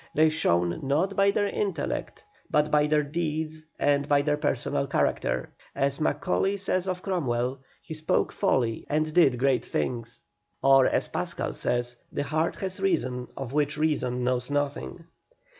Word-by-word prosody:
They 155 +1 +5
shone 85 - +1
not 155 +9 0
by 200 0 +4
their 205 +1 +1
intellect, 195 -6 -3 0.2
but 150 0 +2
by 150 0 +4
their 150 0 +2
deeds 155 0 -3 0.2
and 145 0 +1
by 145 -1 +4
their 150 0 +2
personal 145 -1 -1
character. 140 - 0 0.2
As 140 +2 0
Macaulay 195 +4 +1
says 190 -1 0
of 185 -1 -3
Cromwell, 130 -8 -1 0.2
he - - -7
spoke 155 0 0
folly 115 -4 0
and 155 +1 0
did 140 -8 +5
great 130 -2 +2
things. 115 -1 -3 0.4
Or, 135 -1 +6
as - - +1
Pascal - - -2
says, 120 - -1
the - - -2
heart 155 +3 0
has 190 -1 -3
reason 130 - 0
of 135 -1 -5
which 150 0 +1
reason 130 -5 0
knows 125 0 0
nothing. 145 +3 -2
145 Hz, 155 wpm, -27 LUFS, 130-160 Hz, 0.4 s, Or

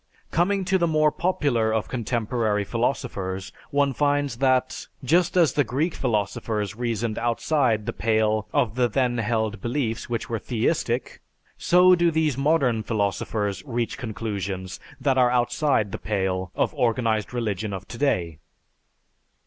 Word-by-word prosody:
Coming 190 +3 +1
to 190 0 +2
the 170 - +2
more 155 -1 +3
popular 140 -11 0
of 110 -1 -1
contemporary 115 -3 -1
philosophers 100 -5 -2 0.2
one 140 -1 +2
finds 145 -3 0
that, 130 -1 +1 0.2
just 170 +6 +2
as 165 -6 +4
the 145 - +3
Greek 140 +8 -1
philosophers 105 -3 -2
reasoned 115 -2 -2
outside 120 -1 +1
the - - -3
pale 110 -1 +1
of 110 -3 +1
the 125 0 +2
then 120 +1 0
held 110 -1 -1
beliefs 120 -2 -2
which 115 -1 -2
were 115 -1 -2
theistic, 120 +2 -1 0.3
so 180 +1 +5
do 175 -1 +4
these 160 -4 +1
modern 135 -5 +2
philosophers 100 -2 -1
reach 120 +3 -3
conclusions 100 -5 -4 0.2
that 135 -2 +2
are 125 -1 +5
outside 120 -2 +1
the - - -5
pale 95 -3 -2
of - - 0
organized 115 -2 0
religion 110 -4 -2
of 95 0 -6
today. 90 - -1
120 Hz, 140 wpm, -24 LUFS, 105-140 Hz, 0.3 s, so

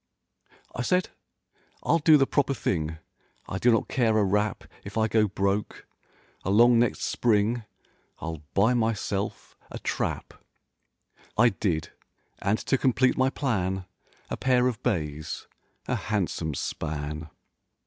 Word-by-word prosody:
I - - -3
said 180 +8 +1 0.8
ril 165 - +3
do 155 0 +7
the 135 - +4
proper 140 0 +1
thing— 80 -7 -1 0.5
I 95 - -3
do 120 - +4
not 115 - +2
care 115 -4 +2
a 105 - +4
rap 105 +2 0 0.2
If 100 +2 -7
I 110 0 +3
go 110 0 +3
broke—along 100 +3 0
next 120 -2 +1
spring 110 0 +1 0.5
ril 80 -2 -5
buy 110 +6 +4
myself 110 -4 -2
a - - -6
trap— - - -3 1.0
I 120 +2 +6
did, 90 -7 -2 0.5
and 100 +2 +1
to 135 - +2
complete 130 0 +3
my 130 0 +3
plan— 95 -10 -1 0.5
A - - -2
pair 125 -1 +3
of 120 -4 -3
bays—a 75 -5 -4
handsome 90 -7 -2
span. 75 +1 -4
105 Hz, 125 wpm, -27 LUFS, 95-120 Hz, 1.0 s, do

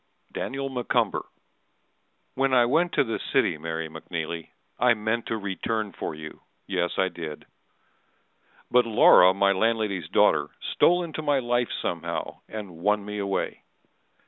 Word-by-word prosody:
Daniel 135 +1 -3
M'Cumber 125 -3 -1 1.1
When 135 0 +1
I 120 -1 +6
went 170 +8 +2
to - - +3
the 115 -3 -3
city, 75 - +1
Mary 80 0 -4
McNeely, 80 +1 -5 0.3
I 120 0 +4
meant 110 +2 -2
to 115 - -1
return 105 +1 -3
for - - -5
you, 75 0 -10 0.2
yes 90 -3 -1
I 95 - +3
did. 80 -4 -7 1.3
But 125 -1 +4
Laura, 95 -4 +7
my 100 0 +3
landlady's 100 -4 0
daughter, - - +3 0.3
Stole 175 +1 +4
into 160 -2 -5
my 145 -2 +2
life 120 -1 0
somehow, 85 0 -3
and 100 -6 -7
won 105 +3 +1
me 105 0 -5
away. 100 -1 -2
105 Hz, 140 wpm, -26 LUFS, 85-120 Hz, 1.3 s, Laura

